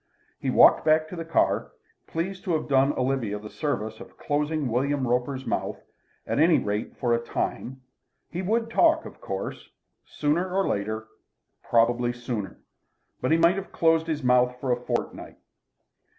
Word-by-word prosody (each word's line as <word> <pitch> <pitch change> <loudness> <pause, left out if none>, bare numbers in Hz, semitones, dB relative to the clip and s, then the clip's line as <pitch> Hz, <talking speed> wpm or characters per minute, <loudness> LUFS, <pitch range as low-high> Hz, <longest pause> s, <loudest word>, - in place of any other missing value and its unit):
He - - -2
walked - - +6
back 155 0 +3
to 180 - -7
the 165 - -4
car, 165 0 0 0.3
pleased 185 +4 -4
to 180 - 0
have 155 - -1
done 135 0 +4
Olivia 125 -5 -1
the 105 0 -10
service 125 -8 -3
of - - -13
closing 150 0 -1
William 130 +3 0
Roper's 125 +2 -1
mouth, - - -2 0.5
at - - -1
any 165 +1 +5
rate 105 +1 -3
for 120 -3 +1
a 115 - +2
time. 130 +2 -4 0.5
He 180 - -3
would 225 +4 0
talk, 320 +4 +4
of - - -11
course, - - -5 0.3
sooner 165 +5 -1
or 195 +1 +1
later, 110 +2 -2 0.5
probably 120 +1 +2
sooner. 120 -6 -5 0.6
But 125 - 0
he 160 - +5
might 170 +3 +4
have 195 - -6
closed 165 0 +2
his 155 -3 -2
mouth 125 0 +3
for 130 -1 -1
a - - +4
fortnight. - - -4
135 Hz, 165 wpm, -26 LUFS, 120-165 Hz, 0.6 s, walked